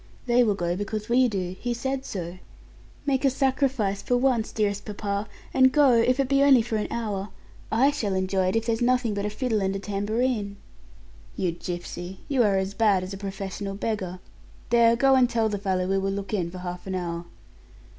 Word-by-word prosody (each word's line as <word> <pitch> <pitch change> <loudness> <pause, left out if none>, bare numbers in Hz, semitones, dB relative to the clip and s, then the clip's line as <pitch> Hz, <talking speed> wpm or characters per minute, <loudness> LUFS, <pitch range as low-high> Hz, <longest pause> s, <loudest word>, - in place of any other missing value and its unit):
They 245 0 +4
will 210 -4 +2
go 175 -2 -1
because 210 +2 -4
we 250 +1 +4
do 185 -4 -3
he 240 -1 -2
said 265 +2 -3
so. 180 -1 -5 0.7
Make 270 -1 +1
a 275 - +5
sacrifice 260 -7 0
for 245 +5 +1
once, 245 -3 +1
dearest 205 -2 -1
papa, 205 0 -3 0.3
and 260 0 +5
go, 285 -1 +5
if 250 +3 +3
it 275 - +2
be 275 +1 +3
only 270 -4 +6
for 225 -1 -2
an 210 - -2
hour. 210 -4 -3 0.4
I 260 +6 +4
shall 215 -9 -2
enjoy 185 0 +1
it 185 - 0
if 225 0 +1
there's 230 0 0
nothing 245 -2 +2
but 200 0 -2
a - - -1
fiddle 220 -1 -1
and 195 0 0
a - - -2
tambourine." 205 +1 -1 0.8
"You 185 -3 0
gipsy! 175 +1 -6
You 275 -4 +2
are 205 -4 +3
as 190 +1 -1
bad 200 -4 +3
as 185 +2 -6
a - - -4
professional 195 0 -5
beggar. 195 -4 -3 0.5
There 235 -1 +5
go 270 +3 +4
and 255 -2 +5
tell 225 -2 +1
the 205 -1 -3
fellow 190 -2 0
we 195 +1 +1
will 195 0 -1
look 200 +1 -5
in 180 -5 0
for 185 - -9
half 180 0 -6
an 190 - -2
hour." 170 -1 -3
210 Hz, 205 wpm, -26 LUFS, 195-245 Hz, 0.8 s, only